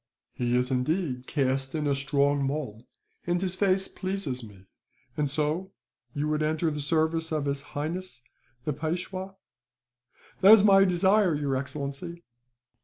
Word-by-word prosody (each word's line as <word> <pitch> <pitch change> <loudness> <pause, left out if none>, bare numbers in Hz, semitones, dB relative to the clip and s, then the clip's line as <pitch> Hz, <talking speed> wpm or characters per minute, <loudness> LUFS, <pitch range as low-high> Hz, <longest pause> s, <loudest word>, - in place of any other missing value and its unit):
"He 120 0 0
is 125 +1 0
indeed 130 0 -1
cast 135 -1 -1
in 155 -1 -1
a 145 - +2
strong 140 +1 +1
mould, 135 -5 -3 0.4
and 175 0 +1
his 185 -1 -1
face 190 0 +1
pleases 185 -10 -4
me. 100 -4 -13 0.5
"And 150 -2 0
so, 155 +6 -1 0.4
you 145 +1 -1
would 155 0 0
enter 155 +1 0
the 150 0 -4
service 160 +2 0
of 155 -2 -1
His 140 0 -1
Highness, 150 -1 -5 0.4
the 150 - 0
Peishwa?" 180 +5 -4 1.0
"That 195 +3 +9
is 215 -3 +7
my 195 -1 +7
desire, 190 0 +3
your 145 -2 -1
excellency." 140 +5 -5
150 Hz, 145 wpm, -27 LUFS, 140-180 Hz, 1.0 s, That